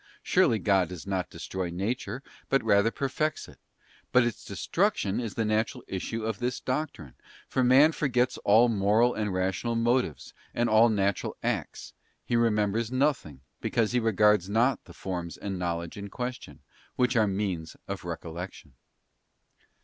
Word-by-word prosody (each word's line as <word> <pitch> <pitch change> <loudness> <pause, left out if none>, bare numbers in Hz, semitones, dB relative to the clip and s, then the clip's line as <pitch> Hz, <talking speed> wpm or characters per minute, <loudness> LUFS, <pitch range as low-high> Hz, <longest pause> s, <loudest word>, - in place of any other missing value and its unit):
Surely 115 - +3
God 95 -5 +2
does 90 -3 -8
not 95 -2 -2
destroy 90 +2 -4
nature, 110 +8 -3 0.3
but 135 - +2
rather 100 +2 +4
perfects 140 +5 -2
it; - - -16 0.5
but 125 - +5
its 120 -2 -3
destruction 105 - 0
is 115 -4 -4
the 115 - 0
natural 110 +4 0
issue 110 +4 -4
of 110 -3 -2
this 125 +1 -2
doctrine, 130 - -4 0.3
for 130 - 0
man 135 +5 +6
forgets 125 -5 0
all 110 +4 +5
moral 110 +2 +3
and 105 -2 -2
rational 95 +6 -1
motives, 120 - 0 0.2
and 120 - +2
all 110 +2 +6
natural 100 -3 0
acts; - - -3 0.3
he 120 - 0
remembers 110 0 +1
nothing, 130 - 0 0.2
because 115 -2 0
he 125 - +2
regards 105 -3 +3
not 120 +5 +2
the - - -13
forms 85 -3 -5
and 95 -2 -4
knowledge 85 -1 -3
in 100 0 -6
question, 125 +2 -6 0.3
which 125 0 +1
are 110 -2 +4
means 95 -5 -3
of - - -5
recollection. 85 -3 -7
110 Hz, 150 wpm, -28 LUFS, 95-125 Hz, 0.5 s, man